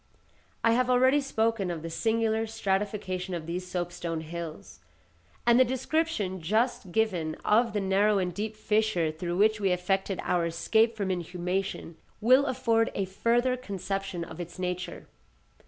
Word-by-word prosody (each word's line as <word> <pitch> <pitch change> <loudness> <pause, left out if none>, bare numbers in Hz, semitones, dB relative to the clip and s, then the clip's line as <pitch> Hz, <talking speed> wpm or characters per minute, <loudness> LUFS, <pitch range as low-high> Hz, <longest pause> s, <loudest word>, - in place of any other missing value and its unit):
I 230 - +5
have 250 +2 +2
already 260 +3 +4
spoken 225 -7 0
of 165 -2 -4
the 165 - -4
singular 225 +4 +1
stratification 195 -3 -2
of 165 -2 -5
these 180 +2 -4
soapstone 175 -2 -3
hills; 165 - -7 0.7
and 235 +1 +5
the - - +8
description 255 - -1
just 215 +2 0
given 180 -7 0
of 230 +1 +3
the 205 - 0
narrow 200 +2 +3
and 180 -2 -1
deep 215 +3 -4
fissure 215 -6 +1
through 175 +2 -4
which 215 +2 +3
we 195 -2 +1
effected 190 +2 0
our 170 -1 +1
escape 220 +7 +2
from 200 -3 -1
inhumation 180 0 -3 0.2
will 255 +6 +5
afford 230 -3 +2
a 195 - 0
further 235 +6 +1
conception 195 -5 -4
of 160 0 -9
its 175 0 -7
nature. 180 0 -4
195 Hz, 150 wpm, -28 LUFS, 180-225 Hz, 0.7 s, the